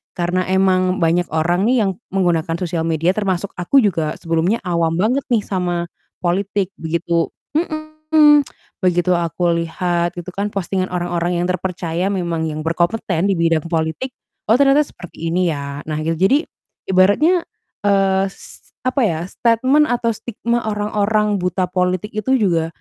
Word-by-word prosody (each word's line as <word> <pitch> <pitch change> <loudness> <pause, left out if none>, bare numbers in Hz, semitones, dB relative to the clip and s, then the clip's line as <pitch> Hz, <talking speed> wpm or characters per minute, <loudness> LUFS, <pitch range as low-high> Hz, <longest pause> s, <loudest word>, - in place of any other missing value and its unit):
karena 180 +1 -1
emang 185 -1 +2
banyak 175 +2 +2
orang 175 +5 +1
nih 245 -2 +3
yang 195 - +1 0.2
menggunakan 170 -4 0
sosial 170 -2 -2
media, 165 +2 +2
termasuk 195 -1 -2
aku 255 +10 +4
juga 160 -7 0
sebelumnya 165 +7 0
awam 170 -3 0
banget 230 +10 0
nih 230 -4 +1
sama 175 -3 -2 0.3
politik, 195 +2 0
begitu 170 +1 0 0.2
mhm. 310 -1 +3 0.4
Begitu 180 0 +2
aku 170 0 0
lihat 170 +1 -1
itu 175 0 -7
kan 200 +3 -2
postingan 190 -1 -1
orang-orang 175 0 -1
yang - - 0
terpercaya, 180 -1 -2
memang 170 -5 -1
yang 155 0 -4
berkompeten 175 +2 0
di 195 - +2
bidang 165 -2 +1
politik, 165 +10 -2 0.3
“Oh 220 - +5
ternyata 280 +2 +5
seperti 165 -1 -8
ini 180 -1 +2
ya.” 140 -1 -5
Nah 155 -1 -2
gitu. 165 +1 0
Jadi 195 - +3 0.4
ibaratnya, 205 - +4 0.4
eee, 195 -1 +3
s - - -15
apa 255 +2 0
ya, 165 -3 -2
statement 260 +6 +3
atau 240 -1 0
stigma 235 +1 -2
orang-orang 210 0 0
buta 180 +1 0
politik 185 +3 0
itu 215 +5 0
juga, 175 -9 +1
185 Hz, 145 wpm, -19 LUFS, 170-210 Hz, 0.4 s, Oh